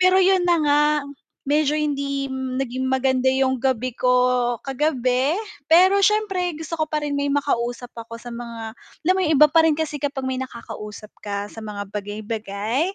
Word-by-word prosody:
Pero 370 +1 +5
'yun 380 -1 +4
na 350 -1 +4
nga, 290 0 +4 0.7
medyo 300 +1 +2
hindi 280 -2 -1
naging 260 -1 -3
maganda 260 0 +2
yung 265 0 +2
gabi 255 -1 -1
ko 250 0 +2 0.5
kagabi 265 -1 0 0.3
pero 365 +5 +6
siyempre 390 -4 +1
gusto 320 +1 -6
ko 315 - +1
pa 305 0 -2
rin 295 -1 -2
may 285 0 0
makausap 245 -4 -1
ako 230 0 -8
sa 240 - -9
mga 235 -1 -7
alam 350 +8 -2
mo - - +1
yung 315 - +2
iba 300 - +9
pa 325 +2 +4
rin 320 - +4
kasi 305 0 -2
kapag 275 -2 -3
may 260 - -2
nakakausap 225 -4 -7 0.2
ka 200 0 -3
sa 225 - -10
mga 205 -1 -6
bagay-bagay, 210 - -3
265 Hz, 170 wpm, -22 LUFS, 235-305 Hz, 0.7 s, iba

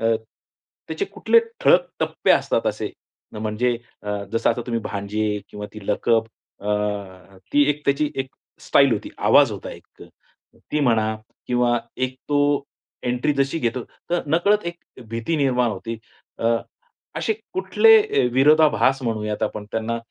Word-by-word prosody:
अ, 115 0 +3 0.7
त्याचे 400 - -2
कुठले 460 - +3 0.2
ठळक - - +5
टप्पे - - 0
असतात - - +2
असे, - - -2 0.5
म्हणजे 110 +3 0 0.3
अ, 105 -1 -3
जसं 115 - +2
आता - - -2
तुम्ही 115 -2 -1
भांजे 105 +1 -2
किंवा 105 0 -7 0.2
लकब 115 +3 +1 0.3
अ, 100 - -9 0.9
ती 145 0 +4
त्याची 140 +2 +1
एक 135 0 -2 0.3
स्टाईल - - +4
होती, - - -2
आवाज - - +5
होता - - -7
एक - - -14 0.7
ती 150 - +1
म्हणा 110 -5 +2 0.3
किंवा 120 -1 +2 0.2
एक 130 0 -1
तो 145 - +1 0.7
एंट्री 125 +4 +1
जशी 140 +4 +1
घेतो 120 -3 -1 0.3
तर 175 0 +2
नकळत 185 +8 +2
एक 170 - -3 0.3
भीती 115 +8 -2
निर्माण 125 -4 +2
होते. 115 +3 -5 0.4
अ, 115 - -1 0.7
असे 440 - 0 0.2
कुठले 450 0 +5
अ, 425 - +1
विरोधाभास 145 -1 +4
म्हणूयात 105 -2 -2
आपण 105 -1 -3
त्यांना. 115 +1 -2
125 Hz, 135 wpm, -22 LUFS, 110-150 Hz, 0.9 s, ठळक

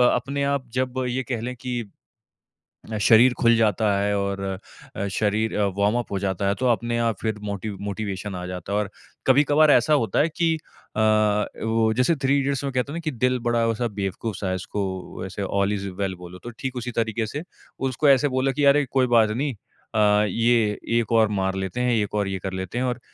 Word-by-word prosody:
अपने 140 +3 -2
आप 130 -3 -5
जब 130 0 -1
ये 130 +2 -1
कह 115 -2 -1
लें 125 +1 -4
कि 125 -1 -4 1.2
शरीर 120 +2 +6
खुल 115 -1 +5
जाता 110 -1 +2
है 100 0 +1
और 100 0 -2 0.6
अ, 100 - -2
शरीर 110 +2 0
अ, 105 - +3
वार्म 105 +3 +2
अप 120 - -4
हो 100 - 0
जाता 100 0 -1
है। 100 - +2
तो 130 - -1
अपने 120 +1 -1
आप 115 -3 +1
फ़िर 110 -1 -1
मोटी 100 +1 -4 0.2
मोटिवेशन 100 -1 -4
आ 90 - -5
जाता 90 +2 -6
है 105 - +2
और 105 -1 -2 0.4
कभी-कभार 145 +3 +5
ऐसा 155 - +4
होता 115 -8 +1
है 155 - +3
कि 165 -1 +2 0.4
अ, - - +1
वो 110 +1 +2
जैसे 125 +7 +3
थ्री 140 +1 +3
इडियट्स 140 0 -1
में 135 - -2
कहता 130 +3 -1
है - - -5
ना - - -3
कि 155 - 0
दिल 125 +1 +1
बड़ा 120 -1 +2
वैसा 115 +1 0
बेवकूफ 100 +1 -4
सा 95 - -3
है - - 0
उसको 95 -1 -5
ऐसे 100 +1 -6
ऑल 100 +1 0
इज़ 100 -1 -4
वेल 95 -1 -1
बोलो 90 +1 -10
तो 120 - -5
ठीक 130 -1 -4
उसी 125 0 -3
तरीके 115 -1 -1
से 145 +8 -5 0.5
उसको 140 +3 +1
ऐसे 140 +2 +4
बोलो 130 +1 0
कि, 145 +2 0
"अरे! 140 +1 +5
कोई 130 -1 +3
बात 115 -3 +4
नहीं। 135 +3 -1
अ, 105 0 0
ये 115 0 +2 0.2
एक 115 0 -4
और 110 -2 +5
मार 95 0 0
लेते 95 +5 -3
हैं, 125 0 +2
एक 105 -1 -1
और 100 -2 0
ये 95 -1 -3
कर 95 0 -4
लेते 95 +5 -4
हैं" 130 - 0
और 125 0 -2
115 Hz, 220 wpm, -24 LUFS, 100-125 Hz, 1.2 s, शरीर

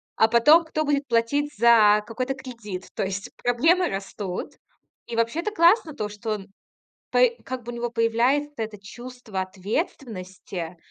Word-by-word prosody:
а 220 - +5
потом 295 +9 +6
кто 310 -1 -2
будет 285 -1 +1
платить 250 +5 +1
за 210 -2 +6
какой-то 255 +4 -3
кредит. 230 -8 -8
То - - -2
есть, 195 +1 -4
проблемы 325 +9 +3
растут. 195 -1 -5 0.5
И, 235 - -5
вообще, 230 +7 +1
это 425 - -2
классно 340 -3 +4
то 210 -6 -3
что 210 +2 -6
он, 195 -2 -9 0.6
по - - +1 0.2
как 255 -1 -5
бы 240 - -6
у - - -7
него 240 0 -2
появляется 240 +5 +1
это 220 -2 -4
чувство 240 -1 -7
ответственности 185 - -5
235 Hz, 155 wpm, -24 LUFS, 210-280 Hz, 0.6 s, потом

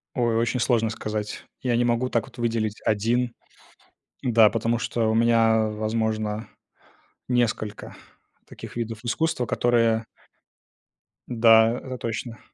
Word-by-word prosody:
Ой, 120 -2 +1
очень 120 +2 0
сложно 115 -2 +2
сказать. 105 -1 -5 0.2
Я 125 -2 0
не 120 - +2
могу 120 +1 +1
так 115 -1 0
вот 135 - -17
выделить 115 -2 -2
один, 115 +3 +1 0.9
да, 115 -3 +5
потому 115 +2 0
что 115 -1 -1
у - - +1
меня, 115 -1 +3
возможно, 110 0 -2 0.8
несколько 120 -4 -1 0.5
таких - - -11
видов 115 -1 -5
искусства, 125 0 -1
которые 115 -1 +2 1.2
Да, 115 0 +5
это 130 0 -7
точно. 115 +1 -5
115 Hz, 120 wpm, -24 LUFS, 110-120 Hz, 1.2 s, да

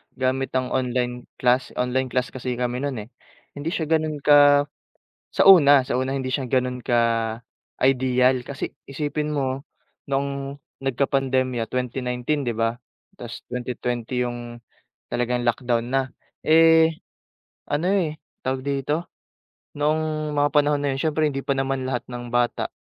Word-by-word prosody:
gamit 130 0 -1
ang 130 -1 0
online 125 -1 -1
class. 125 +1 +1
Online 125 +1 0
class 125 0 -1
kasi 125 -1 -4
kami 125 0 -2
no'n 140 0 -2
eh. 110 - -17 0.5
Hindi 160 +4 -2
siya 160 -1 -3
ganon 155 -2 0
ka 145 -1 +7 0.7
sa - - +2
una, 145 -8 +8
sa - - -2
una 130 +1 0
hindi 130 - -4
siya 130 -3 -2
gano'n 125 -1 0
ka-ideal 125 +2 +1
kasi 140 +1 -6
isipin 150 +2 -3
mo, 135 -2 -1 0.5
noong 140 0 -2 0.2
nagkapandemya 130 -3 0
2019, 125 +3 -2
'di 120 - -1
ba? 115 0 0 0.4
Tas, 120 -1 -9
2020 125 0 -3
yung 120 -1 -6 0.5
talagang 120 0 -1
lockdown 120 0 0
na, 135 - +4 0.4
eh, 160 0 +5 0.7
ano 155 +5 0
eh, 170 -6 0 0.2
tawag 130 0 -1
dito, 140 +4 -2 0.6
noong 155 0 -1
mga 145 0 +3
panahon 145 -1 +3
na 140 - +1
'yon, 135 - -3
siyempre, 155 0 +1
hindi 135 -1 -3
pa 140 0 -1
naman 135 -1 -1
lahat 125 -2 -2
ng 120 -1 -6
bata, 120 0 +1
130 Hz, 140 wpm, -23 LUFS, 125-145 Hz, 0.7 s, una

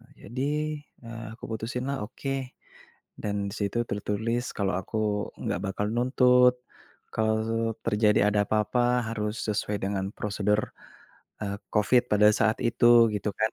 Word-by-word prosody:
Eee, - - -22 0.2
jadi, 130 +5 -2 0.5
eee, 115 0 -7
aku - - -12
putusinlah, 125 +5 -3
"Oke," 135 +1 -5 0.6
dan 100 -1 -2
di 100 - -7
situ 100 +2 -1
tertulis 110 +4 -1
kalo 100 -2 0
aku 105 +1 -2
nggak - - -2
bakal 100 +2 -2
nuntut 125 0 +5 0.6
kalo 110 +1 0
terjadi 105 -1 +3
ada 105 0 +2
apa-apa 120 +3 +1
harus 105 +1 -3
sesuai 105 0 -1
dengan 95 -1 -1
prosedur, 105 0 0 0.7
eee, 100 -1 -2 0.2
Covid 115 +4 +4
pada 105 0 +5
saat 110 0 +2
itu 120 0 +6
gitu 105 +1 -1
kan. 110 0 +1
110 Hz, 135 wpm, -27 LUFS, 105-120 Hz, 0.7 s, itu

